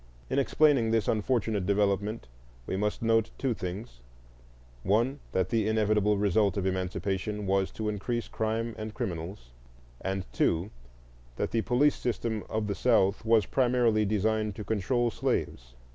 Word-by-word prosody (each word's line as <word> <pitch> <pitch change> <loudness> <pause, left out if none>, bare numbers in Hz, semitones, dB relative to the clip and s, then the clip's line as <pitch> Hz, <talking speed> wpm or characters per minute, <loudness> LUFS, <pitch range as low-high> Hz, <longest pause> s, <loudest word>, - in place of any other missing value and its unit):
In 140 - +2
explaining 140 -4 +3
this 110 -2 +1
unfortunate 110 -3 0
development, 100 - 0 0.4
we - - -3
must 105 +3 -1
note 115 -1 +3
two 135 -3 0
things: 95 - -6 0.8
(1) 115 - +1
that 95 -1 0
the 110 -2 +1
inevitable 105 -1 +2
result 100 0 +2
of 95 - -1
Emancipation 95 +2 -2
was 95 0 +1
to 110 - -4
increase 110 +3 -2
crime 110 +1 -2
and 110 0 -6
criminals, 85 -6 -5 0.5
and 95 -1 -2
(2) 85 +9 +1 0.6
that - - -2
the 115 - +1
police 130 +6 +2
system 115 -3 -2
of 110 0 -1
the 100 - -1
South 100 -3 +2
was 110 -2 +4
primarily 120 -4 +2
designed 105 0 0
to 105 - -6
control 115 +4 0
slaves. - - -2
105 Hz, 145 wpm, -29 LUFS, 100-115 Hz, 0.8 s, was